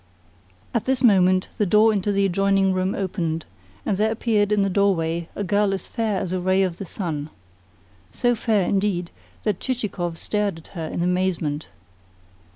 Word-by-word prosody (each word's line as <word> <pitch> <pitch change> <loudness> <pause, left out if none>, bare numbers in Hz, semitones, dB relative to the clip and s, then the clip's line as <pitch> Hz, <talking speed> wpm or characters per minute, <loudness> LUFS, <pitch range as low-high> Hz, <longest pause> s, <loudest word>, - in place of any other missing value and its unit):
At 230 - 0
this 260 -1 0
moment 185 -4 +4
the 210 - +2
door 215 +3 +5
into 205 0 0
the 200 0 +2
adjoining 195 0 +2
room 185 +1 0
opened, 170 -4 -2 0.4
and 195 - 0
there 215 +2 +2
appeared 215 -2 +1
in 210 -1 +3
the - - +1
doorway 170 -4 +1
a 205 - -2
girl 205 0 +2
as 190 - -7
fair 220 -5 -1
as 185 -2 -3
a 185 - 0
ray 185 +2 +2
of 180 -3 -2
the 195 - -6
sun 160 -5 -4 0.8
so 245 0 +1
fair, 215 -5 +1
indeed, 190 -3 0 0.3
that 210 -4 0
Chichikov 195 -9 -3
stared 205 -3 -1
at 165 - -14
her 165 -4 -5
in 170 - -2
amazement. 175 -5 0
195 Hz, 170 wpm, -23 LUFS, 175-210 Hz, 0.8 s, door